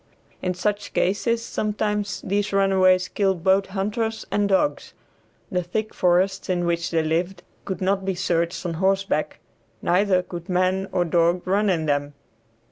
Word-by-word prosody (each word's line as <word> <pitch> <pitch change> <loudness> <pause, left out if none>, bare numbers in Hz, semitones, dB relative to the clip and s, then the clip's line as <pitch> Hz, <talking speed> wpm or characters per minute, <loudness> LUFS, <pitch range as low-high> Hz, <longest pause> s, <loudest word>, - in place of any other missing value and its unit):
In 180 -1 -1
such 205 +3 -2
cases 230 +5 0
sometimes 210 -3 -2
these 205 +1 -1
runaways 190 -2 +3
killed 190 -4 0
both 190 +1 +3
hunters 215 +3 -2
and 205 -1 +1
dogs. 200 +10 0 0.6
The 180 -2 +1
thick 215 +5 -3
forests 185 +2 +1
in 175 -1 0
which 170 0 0
they 165 -1 +1
lived 175 +3 -1 0.2
could 190 -2 -4
not 195 +1 +1
be 190 -1 -1
searched 170 -1 -1
on 170 - -2
horseback, 195 +1 0 0.4
neither 185 0 +2
could 175 -1 -8
man 185 +1 +1
or 175 - +1
dog 170 +1 +2
run 200 +3 +2
in 165 -4 +1
them. 145 -1 -1
190 Hz, 150 wpm, -23 LUFS, 175-200 Hz, 0.6 s, runaways